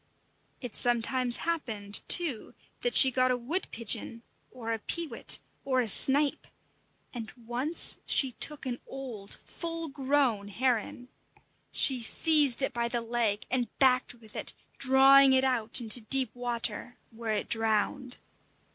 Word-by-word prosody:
It 245 Hz, -5 st, -9 dB
sometimes 245 Hz, +1 st, +2 dB
happened, 225 Hz, -12 st, -4 dB
too, 305 Hz, -11 st, +2 dB, 0.3 s
that 485 Hz, -, -1 dB
she 265 Hz, -, +9 dB
got 255 Hz, 0 st, +1 dB
a 250 Hz, -, 0 dB
wood 295 Hz, +11 st, -3 dB
pigeon, 230 Hz, 0 st, -4 dB, 0.3 s
or 230 Hz, -3 st, -6 dB
a 225 Hz, -, -5 dB
peewit, 310 Hz, +1 st, -2 dB, 0.3 s
or 260 Hz, -2 st, -1 dB
a 245 Hz, -, -1 dB
snipe; 275 Hz, +7 st, 0 dB, 0.7 s
and 230 Hz, -3 st, -8 dB
once 255 Hz, +8 st, +3 dB
she 265 Hz, -2 st, +2 dB
took 300 Hz, +4 st, +1 dB
an 245 Hz, -2 st, -5 dB
old, 240 Hz, -7 st, -2 dB
full 330 Hz, -1 st, -6 dB
grown 270 Hz, -7 st, -1 dB
heron. 245 Hz, +2 st, -3 dB, 0.6 s
She 265 Hz, -2 st, +3 dB
seized 285 Hz, +2 st, +3 dB
it -, -, -2 dB
by 235 Hz, 0 st, -2 dB
the 235 Hz, 0 st, -3 dB
leg 230 Hz, -3 st, -2 dB
and 250 Hz, -2 st, -1 dB
backed 255 Hz, -2 st, +1 dB
with 220 Hz, -3 st, -19 dB
it, -, -, -5 dB, 0.3 s
drawing 270 Hz, +1 st, +5 dB
it 260 Hz, 0 st, +3 dB
out 240 Hz, -4 st, 0 dB
into 235 Hz, 0 st, +3 dB
deep 260 Hz, +4 st, +3 dB
water, 240 Hz, -1 st, -4 dB
where 225 Hz, -1 st, -5 dB
it 210 Hz, -, -4 dB
drowned. 225 Hz, +3 st, -1 dB
245 Hz, 140 wpm, -27 LUFS, 230-270 Hz, 0.7 s, she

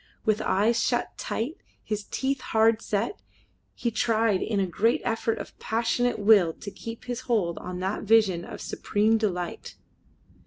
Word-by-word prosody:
With 215 Hz, -1 st, +2 dB
eyes 225 Hz, +4 st, +2 dB
shut 240 Hz, -1 st, 0 dB
tight, 245 Hz, +9 st, -3 dB, 0.3 s
his 210 Hz, -1 st, -3 dB
teeth 270 Hz, 0 st, -2 dB
hard 225 Hz, 0 st, +3 dB
set, 215 Hz, -, -2 dB, 0.5 s
he 235 Hz, -, -1 dB
tried 225 Hz, -3 st, +2 dB
in 215 Hz, -3 st, 0 dB
a 195 Hz, -, +2 dB
great 220 Hz, +6 st, +1 dB
effort 225 Hz, -1 st, 0 dB
of -, -, -8 dB
passionate 235 Hz, +2 st, 0 dB
will 205 Hz, -5 st, +5 dB
to 200 Hz, -, -9 dB
keep 230 Hz, +3 st, -8 dB
his 245 Hz, -1 st, -3 dB
hold 185 Hz, -8 st, +1 dB
on 180 Hz, 0 st, -6 dB
that 190 Hz, +3 st, -2 dB
vision 210 Hz, -5 st, +3 dB
of -, -, -8 dB
supreme 220 Hz, +2 st, +1 dB
delight. 180 Hz, -5 st, -3 dB
220 Hz, 155 wpm, -26 LUFS, 200-230 Hz, 0.5 s, will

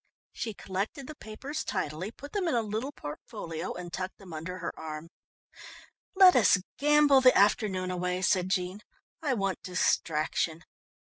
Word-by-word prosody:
She 220 Hz, -3 st, -4 dB
collected 200 Hz, +10 st, -4 dB
the 305 Hz, -, -8 dB
papers 275 Hz, +6 st, -6 dB
tidily, 155 Hz, +7 st, -3 dB
put 285 Hz, +5 st, -11 dB
them 400 Hz, -4 st, 0 dB
in 320 Hz, -, +1 dB
a 230 Hz, -, +2 dB
little 220 Hz, +6 st, -3 dB
portfolio 165 Hz, -, -6 dB
and 175 Hz, -1 st, -7 dB
tucked 185 Hz, 0 st, -4 dB
them 190 Hz, -4 st, -12 dB
under 170 Hz, +4 st, -5 dB
her 175 Hz, -, -4 dB
arm. 155 Hz, +1 st, -7 dB, 1.1 s
"Let 375 Hz, -1 st, +8 dB
us 225 Hz, -5 st, +6 dB, 0.2 s
gamble 295 Hz, -1 st, +5 dB
the 255 Hz, -1 st, +6 dB
afternoon 195 Hz, -2 st, +2 dB
away," 180 Hz, +1 st, -2 dB
said 185 Hz, 0 st, +2 dB
Jean. 185 Hz, +2 st, -1 dB, 0.4 s
"I 285 Hz, -5 st, +1 dB
want 195 Hz, -3 st, -1 dB
distraction." 165 Hz, -2 st, 0 dB
190 Hz, 150 wpm, -29 LUFS, 180-260 Hz, 1.1 s, Let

